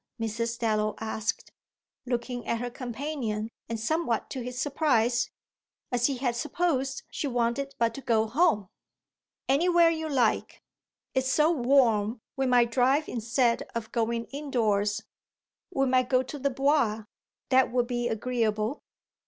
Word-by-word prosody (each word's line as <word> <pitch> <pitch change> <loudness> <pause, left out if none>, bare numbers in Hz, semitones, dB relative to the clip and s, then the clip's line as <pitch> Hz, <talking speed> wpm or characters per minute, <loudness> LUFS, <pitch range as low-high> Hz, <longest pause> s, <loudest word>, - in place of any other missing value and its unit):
Mrs. 230 +1 -2
Dallow 215 -2 0
asked, 220 -1 -3 0.6
looking 245 0 -3
at 230 - +1
her 245 +1 -4
companion 240 -3 -4 0.2
and 230 -1 -3
somewhat 240 -1 -1
to 260 - -4
his 250 +1 -5
surprise, 250 -5 +2 0.6
as 245 -1 +2
he 275 -2 -2
had 245 -2 -1
supposed 275 -2 -1
she 290 - -2
wanted 245 +2 -1
but 230 -1 +1
to 275 - -7
go 225 -4 +2
home. 225 - +2 0.8
"Anywhere 340 +4 +4
you 320 -1 -3
like. 250 -6 0 0.5
It's 260 0 +1
so 310 +2 +4
warm 240 -6 +3 0.2
we 270 -1 0
might 245 -2 +4
drive 265 +5 +3
instead 235 +1 +1
of 225 -2 -4
going 230 0 -1
indoors. 220 -7 0 0.7
We 270 -6 +1
might 255 -1 +2
go 255 -1 +3
to 285 +3 -7
the 280 +1 +1
Bois. 270 -5 +1 0.5
That 260 -1 +4
would 245 -1 +2
be 240 -1 -1
agreeable." 225 +1 -1
245 Hz, 140 wpm, -28 LUFS, 230-275 Hz, 0.8 s, Anywhere